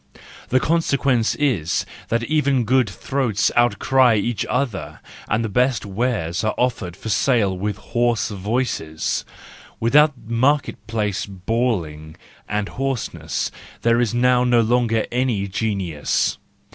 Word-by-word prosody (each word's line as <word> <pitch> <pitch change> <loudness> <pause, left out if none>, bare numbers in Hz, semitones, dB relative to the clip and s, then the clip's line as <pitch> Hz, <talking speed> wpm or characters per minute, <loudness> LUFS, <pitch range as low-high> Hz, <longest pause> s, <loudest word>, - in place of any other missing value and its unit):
The 130 - +3
consequence 140 -7 +1
is 120 - 0 0.2
that 115 0 0
even 140 -2 +1
good 130 +3 +2
throats 125 -7 0
outcry 120 +1 +4
each 110 +2 -1
other, 125 -3 -2 0.3
and 110 +2 +1
the - - -1
best 125 +2 +1
wares 100 -4 -1
are 110 - 0
offered 115 -8 -1
for 110 - -6
sale 110 -4 +2
with 100 +2 -3
hoarse 120 0 0
voices; 100 -6 -2 0.6
without 145 +4 +4
market 130 +6 0
place 105 -4 -2
bawling 95 -7 -2 0.3
and 105 0 -1
hoarseness 135 -3 -3 0.3
there 115 +1 +3
is 120 - +1
now 125 +1 +3
no 120 -1 +4
longer 115 -1 +1
any 120 -5 0
genius. 95 -7 -1
115 Hz, 120 wpm, -21 LUFS, 100-125 Hz, 0.6 s, outcry